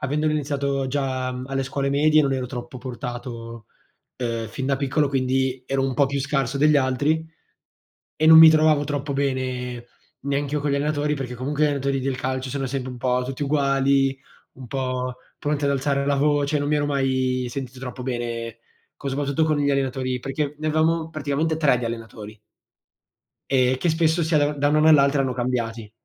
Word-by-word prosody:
avendolo 150 +3 0
iniziato 140 -2 -1
già, 130 -2 -2
mhmm, 125 0 -6
alle 135 0 -2
scuole 135 +1 -2
medie, 155 +2 +4
non 140 -2 +1
ero 130 -1 -2
troppo 120 0 -7
portato, 120 -2 -7 0.5
uhm, 115 -2 -2
fin 135 0 -5
da 135 -1 +1
piccolo. 140 +1 +1
Quindi, 130 -1 0
ero 135 0 0
un 135 -1 -1
po' 140 - +4
più 140 +1 -2
scarso 135 -1 -1
degli 150 +1 +5
altri, 145 +5 +1 0.9
e 155 - +2
non 160 - +10
mi 160 0 +11
trovavo 155 -2 +4
troppo 145 -1 -3
bene 130 -3 -2 0.3
neanche 140 +1 -2
io 150 - 0
con 145 - -1
gli 140 - +1
allenatori, 150 +1 0
perché 130 -3 -5
comunque 140 +5 -1
gli - - +6
allenatori 140 -2 0
del 135 0 -2
calcio 130 0 -3
sono 135 -2 -2
sempre 130 -1 -4
un 125 - -8
po' 125 0 0
tutti 135 +2 -6
uguali, 140 -1 +2 0.4
un 130 -1 -11
po' 130 0 -3 0.2
pronti 145 0 -1
ad 140 - +2
alzare 140 0 0
la 140 - +2
voce, 145 +1 +1
non 145 - -2
mi 150 - +2
ero 145 - +1
mai 130 -3 0
sentito 130 0 -6
troppo 125 -1 -7
bene, 115 -2 -4 0.4
co - - -7
soprattutto 140 +3 0
con 155 -1 +1
gli 145 -1 +1
allenatori, 130 -2 -1
perché 140 +3 -3
ne 155 - -2
avevamo 160 +1 +1
praticamente 155 +1 -1
3 140 -6 +3
di 120 - -3
allenatori 110 -2 -7 1.1
ehm, 130 -1 +3
che 170 +6 -1
spesso 160 +1 +2
si 160 +1 0
ada 145 0 +3
da 145 0 0
un 150 - +2
anno 155 +1 +5
all'altro 140 -2 +5
hanno 130 -1 0
cambiati. 120 -3 -3
135 Hz, 190 wpm, -23 LUFS, 130-145 Hz, 1.1 s, mi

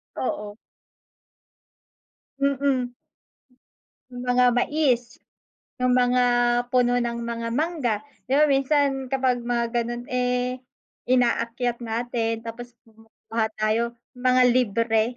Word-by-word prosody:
Oo. 210 -4 -4 1.8
Mm. 275 -3 0 1.2
Yung 245 0 -8
mga 250 0 +3
mais, 250 -4 0 0.6
yung 250 0 +2
mga 250 0 +3 0.5
puno 245 0 +2
ng 235 -1 -2
mga 230 0 -4
mangga, 300 -8 0 0.3
di 270 - +1
ba 300 - +5
minsan 275 -1 +2
kapag 260 -1 +1
mga 235 -1 -1
ganun 240 0 -2
eh, 250 0 0 0.5
inaakyat 240 -1 +1
natin 230 -1 -2
tapos 240 +1 -8
kumukuha 225 0 -5
tayo 225 +2 0 0.2
mga 255 0 +3
libre. 230 -2 +2
245 Hz, 100 wpm, -24 LUFS, 235-255 Hz, 1.8 s, ba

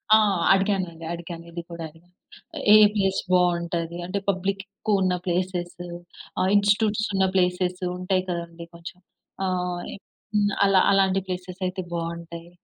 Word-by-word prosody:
ఆ! - - +8 0.4
అడిగానండి. 190 -4 -1
అడిగాను. 170 0 -7
ఇది 170 0 -5
కూడా 170 -1 -6
అడిగాను. 165 +3 -23 0.6
"ఏ - - +10 0.2
ప్లేస్ 195 -2 +1
బావుంటది? 170 -1 +1
అంటే 190 +3 -2
పబ్లిక్ 195 +1 -1
ఎక్కువున్న 200 -2 0
ప్లేసెస్, 180 -1 -2 0.6
ఆహ్, 185 - +2
ఇన్‌స్టిట్యూట్స్ 205 +1 +3
ఉన్న 190 0 +3
ప్లేసెస్ 180 0 +1 0.2
ఉంటాయి 185 0 0
కదండీ 170 -1 -5
కొంచెం. 170 +1 -10 0.5
ఆహ్, 180 -1 -1
ఇం - - -10 0.4
హ్మ్. 205 -1 +3
ఆలా 195 -1 +5
అలాంటి 195 -1 +3
ప్లేసెస్ 180 0 -6
అయితే 185 +1 -4
బావుంటాయి. 170 0 -5
180 Hz, 135 wpm, -25 LUFS, 170-195 Hz, 0.6 s, ఏ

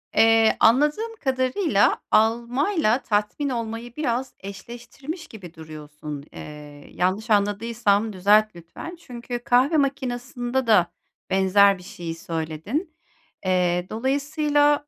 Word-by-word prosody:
Eee, 225 0 +5
anladığım 300 - +3
kadarıyla 260 - +2
almayla 240 - +2
tatmin 210 +7 -1
olmayı 230 -1 -5
biraz 260 -3 -2
eşleştirmiş 240 - -9
gibi 185 -7 -11
duruyorsun. 150 -2 -9
Eee, 150 -1 -11
yanlış 190 +6 -1
anladıysam 210 +1 +1
düzelt 210 +2 +3
lütfen. 175 - -9
Çünkü 245 -5 -6
kahve 275 +5 +3
makinasında 255 -2 -2
da 195 -6 +4 0.4
benzer 195 +1 +4
bir 180 - -14
şeyi 170 -2 -7
söyledin. 165 - -4 0.5
Eee, 180 -1 +1
dolayısıyla, 290 +4 +1
225 Hz, 100 wpm, -23 LUFS, 190-265 Hz, 0.5 s, Eee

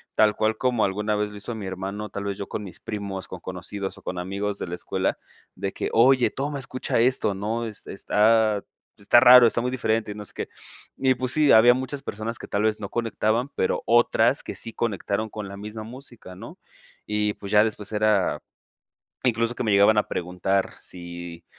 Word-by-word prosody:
tal 105 -1 +4
cual 110 0 0
como 125 -3 +1
alguna 105 +2 -1
vez 105 0 -1
lo 105 - -9
hizo 110 +3 -5
mi 105 -3 -6
hermano, 95 +3 -5
tal 100 0 -5
vez 100 -1 -3
yo 100 - -5
con - - -4
mis 90 -4 -9
primos, 100 -3 -5
con 95 - -7
conocidos 95 +2 -5
o - - -14
con 90 - -4
amigos 100 +3 -3
de - - -4
la 85 - -4
escuela - - -2 0.4
de 95 +1 -3
que: - - -3
"Oye 125 +2 +5
toma 140 +1 -3
escucha 130 -2 -2
esto", 125 -4 +2
¿no?, 110 +4 -2
es 110 -1 -7
está 110 +1 +2 0.3
está 100 +4 +5
raro, 125 -1 +9
está 120 - 0
muy 125 +1 -1
diferente 110 -4 -1
y - - -7
no 105 0 -8
sé - - -6
qué, - - -5 0.5
y 130 -1 +2
pues 125 0 -1
sí, 150 -1 +4
había 120 +2 +8
muchas 130 +2 -4
personas 110 -1 -4
que - - -8
tal 100 - 0
vez 110 0 0
no 100 - -5
conectaban, 115 +1 0
pero 95 - 0
otras 120 +1 +3
que - - -6
sí 115 - -5
conectaron 110 -1 -2
con 105 -1 -6
la 100 - -8
misma 105 +2 -7
música, 120 -5 -10
¿no? - - -11 0.5
Y 105 0 0
pues 100 - -8
ya 105 0 +7
después 105 -2 -3
era 110 0 +2 0.8
incluso 115 -1 +1
que 125 - -3
me 110 - +1
llegaban 100 +2 +5
a 105 - +1
preguntar 90 +2 -1
si 85 -1 -8
105 Hz, 205 wpm, -24 LUFS, 100-115 Hz, 0.8 s, raro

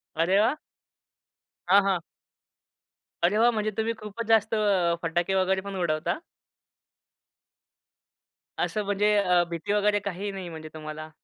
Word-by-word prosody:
अरे 180 +5 +3
वाह! 225 +8 +3 1.1
हां, 200 +2 +6
हां. 190 -3 +1 1.2
अरे 195 +5 +3
वा! 235 +2 +5
म्हणजे 215 -1 -1
तुम्ही 225 +1 0
खूपच 215 +2 -6
जास्त 225 0 +3
अ, 190 -5 +2
फटाके 175 +3 0
वगैरे 190 0 +2
पण 200 0 -7
उडवता? 155 - 0 2.4
असं 215 -1 -1
म्हणजे 205 +1 +2
अ, 180 -3 +3
भीती 170 +4 -3
वगैरे 205 0 +2
काही 200 0 -4
नाही, 190 -3 -6
म्हणजे 160 -1 -8
तुम्हाला? 155 0 -7
195 Hz, 130 wpm, -26 LUFS, 175-210 Hz, 2.4 s, हां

